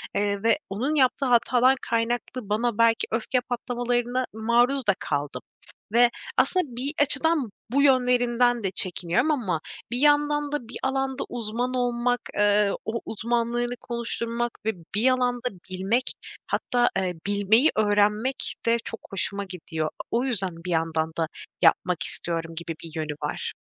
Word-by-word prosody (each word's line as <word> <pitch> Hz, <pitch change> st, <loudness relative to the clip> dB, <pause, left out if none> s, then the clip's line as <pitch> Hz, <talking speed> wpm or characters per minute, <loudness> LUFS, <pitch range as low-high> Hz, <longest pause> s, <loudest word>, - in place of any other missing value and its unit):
eee, 200 Hz, 0 st, 0 dB
ve 230 Hz, -1 st, +4 dB
onun 250 Hz, +10 st, -1 dB
yaptığı 270 Hz, 0 st, +3 dB
hatadan 250 Hz, +1 st, +4 dB
kaynaklı 235 Hz, -1 st, -2 dB
bana 225 Hz, +1 st, 0 dB
belki 230 Hz, 0 st, +3 dB
öfke 235 Hz, +3 st, 0 dB
patlamalarına 245 Hz, 0 st, -1 dB
maruz 235 Hz, +3 st, +2 dB
da 205 Hz, -, +6 dB
kaldım 145 Hz, 0 st, -3 dB, 0.5 s
ve 240 Hz, 0 st, +6 dB, 0.3 s
aslında 365 Hz, -1 st, +3 dB
bir 260 Hz, +4 st, -4 dB
açıdan 290 Hz, -2 st, +2 dB, 0.2 s
bu 280 Hz, +2 st, +3 dB
yönlerinden 245 Hz, -3 st, +3 dB
de 195 Hz, -, 0 dB
çekiniyorum 180 Hz, -, +1 dB
ama 205 Hz, -, 0 dB, 0.3 s
bir 240 Hz, -, 0 dB
yandan 295 Hz, +1 st, +3 dB
da 290 Hz, -6 st, -3 dB
bir -, -, -5 dB
alanda 265 Hz, 0 st, -1 dB
uzman 240 Hz, +2 st, -2 dB
olmak, 245 Hz, 0 st, 0 dB, 0.2 s
eee, 205 Hz, 0 st, +4 dB
o 225 Hz, +1 st, -2 dB
uzmanlığını 240 Hz, +2 st, -1 dB
konuşturmak 235 Hz, 0 st, -2 dB
ve 220 Hz, -, +2 dB, 0.2 s
bir 230 Hz, +5 st, +4 dB
alanda 250 Hz, -1 st, +1 dB, 0.2 s
bilmek 195 Hz, +7 st, 0 dB, 0.4 s
hatta, 245 Hz, -2 st, +1 dB
eee, 185 Hz, -2 st, -1 dB
bilmeyi 205 Hz, +8 st, +4 dB
öğrenmek 210 Hz, +4 st, +2 dB
de 230 Hz, 0 st, +4 dB
çok 225 Hz, -, -6 dB
hoşuma 200 Hz, +1 st, -2 dB
gidiyor. 160 Hz, -4 st, -4 dB, 0.2 s
O 240 Hz, +3 st, +1 dB
yüzden 195 Hz, -9 st, -2 dB
bir 180 Hz, -, -3 dB
yandan 160 Hz, -1 st, 0 dB
da 165 Hz, -1 st, +1 dB, 0.3 s
yapmak 175 Hz, 0 st, +3 dB
istiyorum 165 Hz, -1 st, -3 dB
gibi 170 Hz, 0 st, -4 dB
bir 165 Hz, -, -7 dB
yönü 155 Hz, -2 st, -2 dB
var. 145 Hz, -, -3 dB
235 Hz, 140 wpm, -25 LUFS, 200-250 Hz, 0.5 s, da